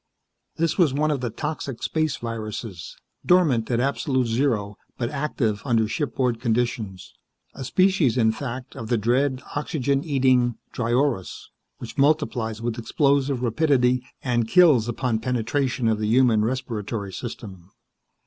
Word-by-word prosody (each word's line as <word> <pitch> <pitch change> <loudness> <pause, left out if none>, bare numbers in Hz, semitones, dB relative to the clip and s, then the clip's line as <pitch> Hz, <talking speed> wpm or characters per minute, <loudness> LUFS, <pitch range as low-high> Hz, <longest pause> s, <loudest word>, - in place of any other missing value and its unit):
This 165 +2 0
was 155 -7 +4
one 155 +1 +1
of 140 -4 -1
the 120 - -2
toxic 140 0 -5
space 155 -3 0
viruses, 110 -5 -6 0.3
dormant 155 -11 +3
at 120 -2 +1
absolute 130 0 0
zero, 115 -4 0 0.2
but 120 -1 -2
active 135 -8 -1
under 115 -5 +2
shipboard 125 -2 -1
conditions. 115 -5 -2 0.4
A 135 - -7
species, 165 - +2
in 110 -2 +4
fact, 125 +1 -6
of 115 - -6
the 120 - +1
dread, 130 +4 +1
oxygen 140 -2 -1
eating 130 -5 +2 0.2
dryorus, 120 -3 -1 0.3
which - - -8
multiplies 125 -7 +1
with 120 0 -2
explosive 140 +1 +1
rapidity, 125 -1 +2 0.2
and 120 -3 0
kills 150 -7 +5
upon 120 -1 -1
penetration 125 +1 -1
of 110 -1 +1
the 105 - -1
human 115 -2 +4
respiratory 110 -4 -3
system. 95 -4 -8
125 Hz, 135 wpm, -24 LUFS, 115-140 Hz, 0.4 s, kills